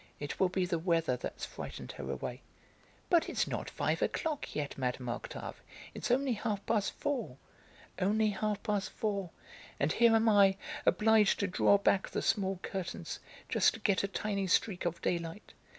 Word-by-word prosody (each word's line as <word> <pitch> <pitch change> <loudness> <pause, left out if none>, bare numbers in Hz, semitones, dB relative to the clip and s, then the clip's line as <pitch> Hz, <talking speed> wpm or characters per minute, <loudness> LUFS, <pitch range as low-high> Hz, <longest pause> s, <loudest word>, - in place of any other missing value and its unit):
"It 145 -1 -5
will 190 - +4
be 185 0 0
the 175 -2 -1
weather 165 -5 +1
that's 125 - -5
frightened - - -7
her - - -7
away." - - -4 0.7
"But 340 -2 +3
it's - - +1
not - - -3
five - - -1
o'clock 310 -3 -2
yet, 145 -2 -2
Mme. 125 -1 -2
Octave, 120 - -5 0.3
it's - - -4
only 260 +1 +2
half 210 -2 -2
past 215 -3 +1
four." 245 - -3 0.6
"Only 210 +3 +2
half 210 0 -2
past 205 -3 0
four! 200 -5 -2 0.5
And 140 +2 +2
here 235 -1 +5
am 225 0 +3
I, 200 -3 +6 0.3
obliged 220 -2 +4
to 200 - +1
draw 200 +2 +4
back 200 -1 +2
the - - -2
small 195 -3 +1
curtains, 190 -2 -4 0.3
just - - +3
to - - -9
get 200 -3 +2
a - - +1
tiny 200 0 -2
streak 185 0 +1
of 170 -1 -1
daylight. 170 +2 -3
200 Hz, 170 wpm, -32 LUFS, 175-220 Hz, 0.7 s, I